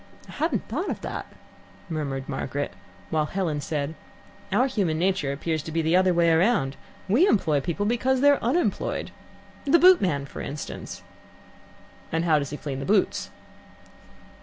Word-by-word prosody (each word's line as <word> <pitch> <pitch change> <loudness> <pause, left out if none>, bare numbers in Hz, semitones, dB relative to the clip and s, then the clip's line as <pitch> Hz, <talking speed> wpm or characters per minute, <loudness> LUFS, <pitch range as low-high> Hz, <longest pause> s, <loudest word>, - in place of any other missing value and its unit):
"I - - -11
hadn't 300 - -1
thought 315 - -2
of - - -4
that," - - -5 0.6
murmured 140 -5 -3
Margaret, 140 0 -3 0.4
while 155 -1 +1
Helen 165 -5 -2
said, 145 0 -2 0.6
"Our 255 - +3
human 200 -12 0
nature 180 -5 +1
appears 155 +3 -2
to 160 - -7
be 165 +1 0
the 160 +2 +2
other 185 0 +4
way 170 -1 +3
round. 160 - +2 0.3
We 250 - +4
employ 155 - +2
people 175 +6 -2
because 250 +4 +1
they're 285 +1 +4
unemployed. 275 +10 0 0.5
The 290 +4 +5
boot 365 +1 +7
man, 145 -8 0
for - - -8
instance." 150 +1 -6 1.1
"And 165 +1 0
how 155 -3 +4
does 140 -1 -4
he 150 - -5
clean 135 -3 -5
the - - -4
boots?" 200 -1 +1
170 Hz, 160 wpm, -25 LUFS, 150-225 Hz, 1.1 s, boot